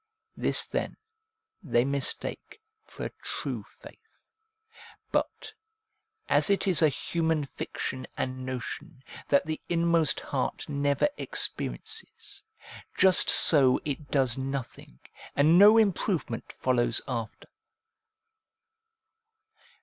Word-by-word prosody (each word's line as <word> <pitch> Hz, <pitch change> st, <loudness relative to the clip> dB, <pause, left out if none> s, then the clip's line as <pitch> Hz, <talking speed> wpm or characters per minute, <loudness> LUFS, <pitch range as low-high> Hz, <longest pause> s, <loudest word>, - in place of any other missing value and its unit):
This -, -, +1 dB
then -, -, -4 dB, 0.6 s
they 120 Hz, -, +1 dB
mistake 140 Hz, -, -2 dB, 0.2 s
for -, -, -9 dB
a -, -, -5 dB
true -, -, -5 dB
faith. 445 Hz, 0 st, -18 dB, 0.8 s
But, -, -, -2 dB, 0.7 s
as -, -, +3 dB
it 200 Hz, 0 st, +2 dB
is 185 Hz, -4 st, +4 dB
a 155 Hz, -, +5 dB
human 160 Hz, +1 st, -1 dB
fiction 130 Hz, -1 st, -6 dB
and 130 Hz, 0 st, -4 dB
notion, 130 Hz, +3 st, -7 dB, 0.2 s
that 140 Hz, -, +3 dB
the 155 Hz, 0 st, -4 dB
inmost 170 Hz, -2 st, +2 dB
heart 130 Hz, -2 st, -3 dB
never 140 Hz, -, +1 dB
experiences, 440 Hz, +1 st, -4 dB, 0.6 s
just 190 Hz, -1 st, +6 dB
so 135 Hz, -5 st, +6 dB
it 145 Hz, -1 st, -5 dB
does 135 Hz, -3 st, +1 dB
nothing, 130 Hz, -, -6 dB, 0.4 s
and 155 Hz, +5 st, +5 dB
no 210 Hz, +3 st, +8 dB
improvement 190 Hz, -, 0 dB
follows 120 Hz, -2 st, 0 dB
after. 115 Hz, -4 st, -5 dB
145 Hz, 100 wpm, -27 LUFS, 130-170 Hz, 0.8 s, no